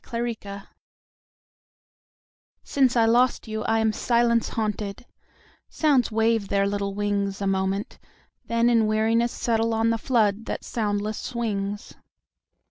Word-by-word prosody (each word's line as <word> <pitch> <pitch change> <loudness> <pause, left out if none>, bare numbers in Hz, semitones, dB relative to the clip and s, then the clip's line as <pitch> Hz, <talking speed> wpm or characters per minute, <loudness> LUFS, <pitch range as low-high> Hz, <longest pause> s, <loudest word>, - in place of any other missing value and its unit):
Silence 220 -4 -5 2.0
SINCE 265 -3 +2
I 230 - +5
lost 240 +2 +2
you 220 0 -4
I 225 - +2
am 220 -1 +1
silence 235 0 +2
haunted, 210 -1 -3 0.6
Sounds 280 -7 +2
wave 225 -1 +1
their 200 0 +1
little 200 0 -2
wingsA 200 -1 -1
moment, 195 +1 -1 0.5
then 230 0 +1
in 230 -2 +3
weariness 225 +2 +2
settleOn 225 -1 0
the 230 - -1
flood 220 -4 +1
that - - -4
soundless 210 -1 -2
swings. 205 -4 -4
220 Hz, 115 wpm, -25 LUFS, 205-235 Hz, 2.0 s, I